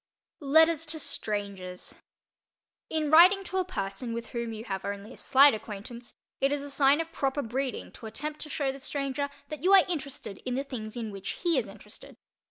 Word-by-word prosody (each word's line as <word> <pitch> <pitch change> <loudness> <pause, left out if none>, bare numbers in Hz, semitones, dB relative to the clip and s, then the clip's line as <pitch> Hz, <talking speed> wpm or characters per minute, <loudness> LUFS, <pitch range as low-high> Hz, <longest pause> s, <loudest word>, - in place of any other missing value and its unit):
LETTERS 320 +2 +4
TO 315 +1 -1
STRANGERS 200 -8 -4 1.0
In 310 -2 0
writing 365 +5 +8
to 375 0 -2
a - - +2
person 230 - -4
with 235 0 -5
whom 235 -1 -3
you 220 0 -6
have 195 -4 -4
only 200 +4 -5
a - - -14
slight 275 +1 +6
acquaintance, 220 +3 -8 0.2
it 275 +1 +2
is 290 -1 -1
a 285 - -7
sign 280 +1 +4
of 330 0 -3
proper 275 -1 -1
breeding 255 +3 -3
to 225 - -10
attempt 300 +7 -5
to 305 - -8
show 280 -2 -1
the 270 - -9
stranger 280 +1 -2 0.2
that 305 -2 -6
you 380 +2 +5
are 385 -2 +8
interested 280 - -5
in 250 -1 -3
the 270 - -1
things 235 -5 -7
in 225 -3 -4
which 195 -1 -5
he 340 -2 +3
is - - +1
interested. - - -11
270 Hz, 195 wpm, -29 LUFS, 220-305 Hz, 1.0 s, writing